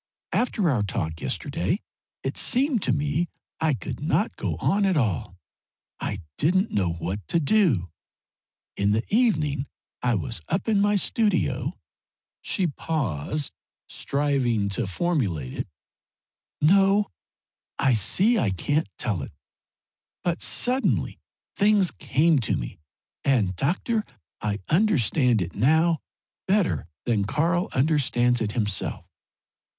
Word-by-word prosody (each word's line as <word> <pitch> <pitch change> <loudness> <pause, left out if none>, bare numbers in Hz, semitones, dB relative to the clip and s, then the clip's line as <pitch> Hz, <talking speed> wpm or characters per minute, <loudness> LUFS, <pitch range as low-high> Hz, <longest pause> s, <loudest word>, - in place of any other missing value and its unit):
After 220 -6 +1
our 120 -6 +1
talk 80 -5 -3
yesterday - - -1 0.4
it 135 - -2
seemed 255 -2 +2
to 130 - +1
me 150 +5 0 0.3
I 155 -3 +2
could - - -6
not 155 +8 0
go - - -2
on 205 +1 +1
at 190 -4 +2
all. 95 - -1 0.6
I 100 - -3 0.2
didn't 185 +7 +2
know 90 -4 +1
what 85 +4 -3
to 170 - +1
do. 150 - +2 0.8
In 100 +1 +2
the 110 +2 +1
evening 150 - +2 0.3
I 125 -2 +2
was 115 -3 -1
up 195 - -1
in 210 -3 +3
my 205 +1 +3
studio 180 - +1 0.3
" - - -69
she 190 - 0
paused, 145 - -2 0.3
striving 135 -7 0
to 105 +2 -1
formulate 95 - -1
it, - - -4 0.9
"No, 195 +5 +4 0.7
I 135 -2 +3
see 195 - +3
I 135 - +1
can't 145 - 0
tell 105 -9 -1
it, - - -7 0.9
but 175 -2 -1
suddenly 255 +2 +1 0.4
things 205 -3 +3
came 155 +3 +2
to 105 -6 0
me, - - -6 0.4
and, 110 -9 +2
doctor, 190 - 0 0.4
I 105 -1 -2
understand 140 - +3
it 85 - -7
now 160 +7 +3 0.5
better 190 - +1 0.2
than 110 -4 +1
Karl 170 - +1
understands 125 -4 +2
it 105 -1 -1
himself." 105 -5 -1
145 Hz, 125 wpm, -25 LUFS, -, 0.9 s, No